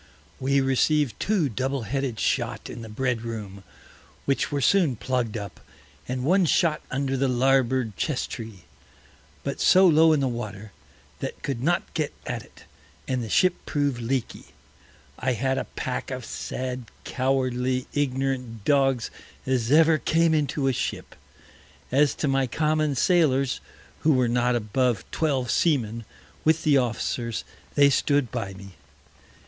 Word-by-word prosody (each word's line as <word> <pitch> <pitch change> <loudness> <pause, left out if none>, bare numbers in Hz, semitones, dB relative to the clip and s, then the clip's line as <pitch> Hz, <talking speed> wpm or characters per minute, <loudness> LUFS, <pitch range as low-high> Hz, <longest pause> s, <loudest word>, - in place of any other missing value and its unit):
We 135 +1 +2
received 135 -1 +1
two 200 -8 +1
Double 130 +1 -2
headed 130 0 -2
Shot - - -1
in 115 - -8
the 110 - -8
Bread 125 +1 -1
room, 105 -4 -6 0.6
which 140 +2 0
were 145 - 0
soon 160 -1 +3
plugg'd 120 -2 -2
up, 100 -2 -7 0.5
and 125 0 -3
one 180 +6 +3
Shot 160 -1 +2
under 135 0 -1
the 135 +1 +1
Larboard 130 -3 +2
Chesstree, 115 - -4 0.8
but - - -4
so 190 +1 +6
low 160 -1 +6
in 155 - +3
the 135 - +1
Water, 110 -4 -5 0.5
that - - -6
could 135 -4 -3
not 175 +6 0
get 155 -3 -2
at 120 -2 -3
it, - - -17 0.4
and 130 -1 -1
the 110 - -6
Ship 185 - +4
prov'd 145 -4 0
leaky. 125 +1 -3 0.7
I 130 +1 0
had 130 +3 0
a - - -3
Pack 125 - -3
of 130 -3 -5
sad 125 -1 -5 0.2
cowardly, 130 -1 0
ignorant 130 -5 -2
Dogs 135 -4 +2 0.3
as 130 -2 0
ever 160 +1 +5
came 165 +1 +2
into 145 -2 0
a 135 - +2
Ship. - - -4 0.8
As 140 +2 +3
to 150 - -1
my 135 -1 +2
common 155 +2 0
Sailors, 140 -4 +2 0.4
who 155 0 +3
were 130 -2 +3
not 120 +1 +1
above 120 +1 0
Twelve 135 -6 0
Seamen, 115 -8 +1 0.4
with 160 +1 +2
the 150 -3 +4
Officers, 120 -1 -2 0.3
they 140 -1 +6
stood 140 -2 +1
by 100 -6 -4
me. 100 +1 -11
130 Hz, 145 wpm, -25 LUFS, 120-145 Hz, 0.8 s, so